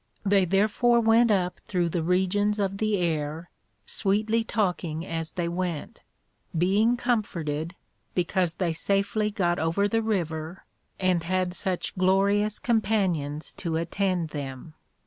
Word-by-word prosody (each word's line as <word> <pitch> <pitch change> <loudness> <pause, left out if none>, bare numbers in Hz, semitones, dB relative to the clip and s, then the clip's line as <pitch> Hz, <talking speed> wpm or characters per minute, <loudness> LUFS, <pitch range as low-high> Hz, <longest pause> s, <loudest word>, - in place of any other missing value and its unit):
They 195 -1 +4
therefore 215 +6 +3
went 230 +1 +4
up 185 -4 +1
through 175 -3 0
the 170 0 -1
Regions 190 +4 +1
of 195 -1 -1
the 215 -1 +1
Air, 160 -1 -2 0.3
sweetly 215 +3 +1
talking 180 -7 -1
as 165 -2 -4
they 175 -2 -2
went, 170 -2 -4 0.6
being 205 +8 +3
comforted, 170 - -2 0.4
because 180 -1 0
they 175 -3 0
safely 200 +5 0
got 180 -5 0
over 165 +6 +1
the 225 +2 +1
River, 170 -5 -3 0.3
and 185 -2 +2
had 180 +1 -1
such 185 -1 -2
glorious 200 +3 +2
Companions 190 - 0
to 165 -3 -2
attend 175 0 -1
them. 140 +1 -7
185 Hz, 125 wpm, -26 LUFS, 165-205 Hz, 0.6 s, They